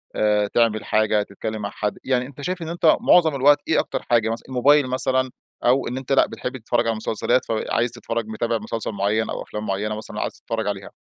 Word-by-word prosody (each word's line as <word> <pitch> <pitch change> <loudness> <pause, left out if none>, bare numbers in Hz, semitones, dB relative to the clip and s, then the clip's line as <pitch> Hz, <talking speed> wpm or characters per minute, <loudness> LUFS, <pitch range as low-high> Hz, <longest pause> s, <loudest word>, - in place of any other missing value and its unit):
آآ 105 -1 +2
تعمل 110 0 +1
حاجة، 110 -1 +2
تتكلم 105 +2 -6
مع 100 - -3
حد، 105 0 -3
يعني 125 -1 +1
أنت 140 +1 -11
شايف 180 +5 -3
إن 165 - -5
أنت 170 -2 +4
معظم 160 -4 +5
الوقت 145 +2 +5
إيه - - +3
أكتر - - -2
حاجة 115 -2 +3
مثلًا، 115 +1 -4
الموبايل 140 +2 +4
مثلًا، 130 0 +1 0.4
أو 130 +2 +3
إن 125 - -4
أنت 130 0 -6
لأ 135 - +5
بتحب 125 +1 -5
تتفرج 120 0 0
على - - +3
المسلسلات، 115 +3 0
فعايز 115 +1 -1
تتفرج 115 -2 -4
متابع 115 +1 -1
مسلسل 110 +1 -4
معيّن 105 +2 0
أو - - -4
أفلام 105 0 -6
معينة 105 +2 -2
مثلًا 110 - -6
عايز - - -2
تتفرج 110 -2 -4
عليها؟ 100 -1 -4
115 Hz, 210 wpm, -22 LUFS, 110-130 Hz, 0.4 s, معظم